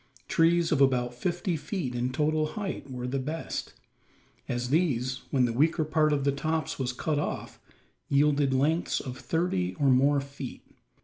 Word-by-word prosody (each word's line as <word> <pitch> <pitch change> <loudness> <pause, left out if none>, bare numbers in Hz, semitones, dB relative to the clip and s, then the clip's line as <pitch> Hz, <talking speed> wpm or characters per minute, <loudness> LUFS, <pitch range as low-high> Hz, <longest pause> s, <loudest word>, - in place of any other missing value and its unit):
Trees 165 0 +3
of 145 -3 +3
about 125 -2 +3
fifty 175 +7 -1
feet 150 -3 -3
in 120 +1 -1
total 155 +3 0
height 195 -8 -4
were 125 -1 -5
the 130 +2 -1
best: 155 +5 -4 0.8
as 125 +1 -2
these, 130 -6 +1
when 130 -3 +3
the 115 - -1
weaker 155 +5 +2
part 155 0 +2
of 145 -2 +1
the 140 - +3
tops 155 +2 -2
was 130 -1 0
cut 145 +4 -1
off, - - -4 0.5
yielded 140 -1 +3
lengths 150 +6 +1
of 130 -2 -6
thirty 95 - -1
or 140 +5 +2
more 140 +3 +4
feet. 140 -1 -8
140 Hz, 165 wpm, -28 LUFS, 130-155 Hz, 0.8 s, more